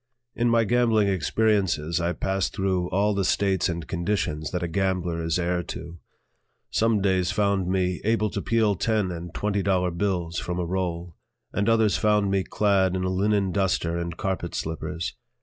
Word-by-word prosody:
In 120 Hz, 0 st, +1 dB
my 115 Hz, 0 st, +4 dB
gambling 115 Hz, -2 st, +3 dB
experiences 95 Hz, -3 st, +1 dB
I 85 Hz, +1 st, 0 dB
passed 95 Hz, +1 st, -1 dB
through 95 Hz, -3 st, 0 dB
all 100 Hz, +3 st, +2 dB
the 100 Hz, -1 st, 0 dB
states 95 Hz, 0 st, +1 dB
and 85 Hz, -2 st, -4 dB
conditions 85 Hz, -4 st, -1 dB
that 90 Hz, 0 st, -3 dB
a -, -, 0 dB
gambler 90 Hz, -2 st, -1 dB
is 80 Hz, 0 st, 0 dB
heir 90 Hz, 0 st, 0 dB
to. 85 Hz, +1 st, -8 dB, 0.7 s
Some 110 Hz, -2 st, +2 dB
days 95 Hz, -3 st, +2 dB
found 100 Hz, -2 st, +1 dB
me 90 Hz, -1 st, 0 dB
able 110 Hz, -1 st, +1 dB
to -, -, -3 dB
peel 110 Hz, -3 st, +2 dB
ten 105 Hz, -1 st, 0 dB
and 85 Hz, 0 st, -6 dB
twenty 100 Hz, +2 st, -1 dB
dollar 90 Hz, -2 st, +1 dB
bills 85 Hz, -2 st, -1 dB
from 90 Hz, 0 st, -4 dB
a 90 Hz, -, -1 dB
roll, 85 Hz, -2 st, -3 dB, 0.4 s
and 100 Hz, +2 st, +1 dB
others 110 Hz, -2 st, +3 dB
found 105 Hz, -2 st, +2 dB
me 95 Hz, -1 st, +1 dB
clad 95 Hz, -3 st, +2 dB
in 90 Hz, -, -1 dB
a 95 Hz, -, 0 dB
linen 100 Hz, 0 st, +1 dB
duster 90 Hz, -3 st, 0 dB
and 85 Hz, -1 st, -4 dB
carpet 95 Hz, -3 st, -3 dB
slippers. 80 Hz, +1 st, -4 dB
95 Hz, 175 wpm, -25 LUFS, 85-100 Hz, 0.7 s, my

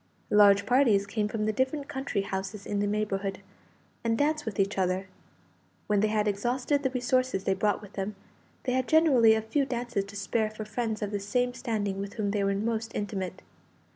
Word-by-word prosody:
Large 200 Hz, -1 st, +6 dB
parties 230 Hz, -5 st, +4 dB
came 210 Hz, +1 st, -1 dB
from 215 Hz, 0 st, -2 dB
the 215 Hz, -, +1 dB
different 265 Hz, +4 st, -1 dB
country 265 Hz, -8 st, -2 dB
houses 195 Hz, +1 st, -5 dB
in 205 Hz, -, -2 dB
the 205 Hz, -, +1 dB
neighbourhood, 200 Hz, -2 st, -1 dB, 0.6 s
and 225 Hz, -1 st, +1 dB
danced 300 Hz, 0 st, 0 dB
with 205 Hz, -3 st, -4 dB
each 195 Hz, 0 st, +1 dB
other. 185 Hz, +1 st, 0 dB, 0.8 s
When 210 Hz, -1 st, +2 dB
they 215 Hz, -, +3 dB
had 215 Hz, 0 st, +1 dB
exhausted 245 Hz, +7 st, 0 dB
the 265 Hz, -, +1 dB
resources 255 Hz, -4 st, 0 dB
they 195 Hz, -, +2 dB
brought 205 Hz, +2 st, 0 dB
with 205 Hz, -, -12 dB
them, 200 Hz, +1 st, -3 dB, 0.5 s
they 255 Hz, -, -1 dB
had 255 Hz, 0 st, 0 dB
generally 265 Hz, -9 st, +5 dB
a 220 Hz, -, -1 dB
few 275 Hz, +6 st, +1 dB
dances 240 Hz, -5 st, -2 dB
to 200 Hz, +1 st, -12 dB
spare 215 Hz, +2 st, 0 dB
for 215 Hz, 0 st, -7 dB
friends 220 Hz, -1 st, -2 dB
of 205 Hz, -, -3 dB
the 205 Hz, -, -1 dB
same 245 Hz, +5 st, 0 dB
standing 205 Hz, -5 st, -2 dB
with 200 Hz, 0 st, -5 dB
whom 205 Hz, -3 st, -1 dB
they 205 Hz, -1 st, 0 dB
were 195 Hz, 0 st, +1 dB
most 225 Hz, +2 st, -2 dB
intimate. 190 Hz, -3 st, -4 dB
215 Hz, 200 wpm, -28 LUFS, 200-245 Hz, 0.8 s, Large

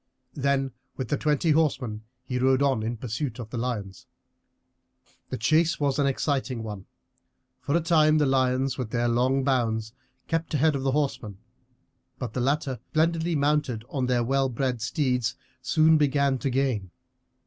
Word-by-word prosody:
Then 135 Hz, -1 st, 0 dB, 0.3 s
with 130 Hz, -3 st, -4 dB
the -, -, +2 dB
twenty 150 Hz, +2 st, +1 dB
horsemen 135 Hz, -8 st, +1 dB, 0.2 s
he 125 Hz, -1 st, -3 dB
rode 130 Hz, +1 st, +3 dB
on 135 Hz, -5 st, +2 dB
in 115 Hz, +2 st, -3 dB
pursuit 120 Hz, +2 st, -4 dB
of 115 Hz, -3 st, -8 dB
the 125 Hz, -, -4 dB
lions. 105 Hz, -6 st, -4 dB, 1.2 s
The -, -, -3 dB
chase 155 Hz, +9 st, +2 dB
was 140 Hz, -1 st, 0 dB
an 140 Hz, -, +3 dB
exciting 135 Hz, -3 st, -1 dB
one. 105 Hz, -3 st, -7 dB, 0.7 s
For 140 Hz, -, -1 dB
a -, -, 0 dB
time 155 Hz, -2 st, +4 dB
the 150 Hz, -, +3 dB
lions, 130 Hz, 0 st, +1 dB
with 125 Hz, -4 st, -3 dB
their 120 Hz, +1 st, 0 dB
long 130 Hz, +3 st, +2 dB
bounds, 115 Hz, -5 st, 0 dB, 0.3 s
kept 165 Hz, -1 st, -2 dB
ahead 150 Hz, +1 st, +3 dB
of 135 Hz, -, -2 dB
the 135 Hz, -1 st, 0 dB
horsemen; 135 Hz, -9 st, -2 dB, 0.8 s
but 125 Hz, -5 st, -5 dB
the 125 Hz, -, -1 dB
latter, 135 Hz, -1 st, 0 dB
splendidly 165 Hz, +1 st, +1 dB
mounted 145 Hz, -6 st, 0 dB
on 130 Hz, -3 st, -1 dB
their 125 Hz, -1 st, +2 dB
well 135 Hz, +2 st, +1 dB
bred 125 Hz, -1 st, -2 dB
steeds, 125 Hz, 0 st, 0 dB, 0.3 s
soon 155 Hz, +4 st, +4 dB
began 140 Hz, -2 st, +2 dB
to 140 Hz, -, -1 dB
gain. 125 Hz, -7 st, 0 dB
135 Hz, 160 wpm, -26 LUFS, 120-145 Hz, 1.2 s, time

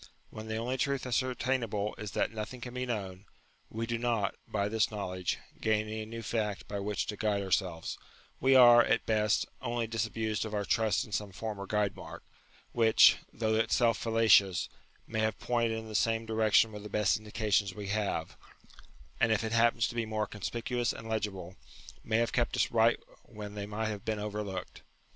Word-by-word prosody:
"When 110 Hz, 0 st, -8 dB
the 110 Hz, 0 st, -3 dB
only 125 Hz, +3 st, -2 dB
truth 140 Hz, -2 st, 0 dB
ascertainable 120 Hz, -4 st, -1 dB
is 105 Hz, -1 st, -6 dB
that -, -, 0 dB
nothing 110 Hz, +3 st, -6 dB
can 125 Hz, 0 st, -7 dB
be 125 Hz, 0 st, -3 dB
known, 100 Hz, -4 st, -4 dB, 0.4 s
we 115 Hz, +1 st, -3 dB
do 115 Hz, 0 st, -2 dB
not, 115 Hz, -5 st, 0 dB
by 100 Hz, -1 st, -1 dB
this 110 Hz, +1 st, +1 dB
knowledge, 95 Hz, -4 st, -3 dB, 0.2 s
gain 110 Hz, -1 st, +1 dB
any 110 Hz, 0 st, -4 dB
new 115 Hz, +1 st, -7 dB
fact 105 Hz, -2 st, -2 dB
by 100 Hz, -, -4 dB
which 100 Hz, +1 st, -2 dB
to 105 Hz, -, -4 dB
guide 105 Hz, -1 st, 0 dB
ourselves; 90 Hz, -3 st, -1 dB, 0.4 s
we 135 Hz, +1 st, +4 dB
are, 120 Hz, -2 st, +9 dB
at 115 Hz, -, +1 dB
best, 105 Hz, -1 st, +2 dB, 0.2 s
only 120 Hz, -1 st, -1 dB
disabused 110 Hz, -1 st, -2 dB
of 110 Hz, -1 st, -4 dB
our 100 Hz, -1 st, -1 dB
trust 110 Hz, 0 st, +1 dB
in 110 Hz, -, -15 dB
some 105 Hz, 0 st, -2 dB
former 100 Hz, 0 st, -5 dB
guide 105 Hz, -2 st, 0 dB
mark, -, -, -10 dB, 0.5 s
which, 115 Hz, -2 st, +6 dB
though 110 Hz, -1 st, -1 dB
itself 115 Hz, +1 st, +3 dB
fallacious, 110 Hz, -5 st, +3 dB, 0.4 s
may 110 Hz, -, -3 dB
have 110 Hz, -1 st, 0 dB
pointed 115 Hz, -2 st, 0 dB
in 110 Hz, 0 st, -7 dB
the 110 Hz, -, -8 dB
same 115 Hz, +2 st, +1 dB
direction 110 Hz, 0 st, +3 dB
with 105 Hz, -1 st, -8 dB
the 105 Hz, -, -8 dB
best 105 Hz, -1 st, +2 dB
indications 105 Hz, -2 st, 0 dB
we 100 Hz, -2 st, -6 dB
have, 105 Hz, 0 st, -2 dB, 0.8 s
and 115 Hz, -, +3 dB
if 110 Hz, 0 st, +2 dB
it 110 Hz, -, -2 dB
happens 115 Hz, 0 st, +3 dB
to -, -, -6 dB
be 115 Hz, -1 st, -2 dB
more 110 Hz, -1 st, -1 dB
conspicuous 120 Hz, +3 st, -2 dB
and 115 Hz, -, -9 dB
legible, 95 Hz, -5 st, -3 dB, 0.5 s
may 110 Hz, -, +1 dB
have 115 Hz, 0 st, 0 dB
kept 120 Hz, -2 st, +1 dB
us -, -, +1 dB
right 115 Hz, 0 st, +4 dB, 0.2 s
when 105 Hz, -3 st, -9 dB
they 100 Hz, -1 st, -5 dB
might 110 Hz, +1 st, -2 dB
have 105 Hz, -2 st, -5 dB
been 110 Hz, -1 st, -2 dB
over 105 Hz, 0 st, -3 dB
looked. 95 Hz, -3 st, -6 dB
110 Hz, 190 wpm, -31 LUFS, 105-115 Hz, 0.8 s, are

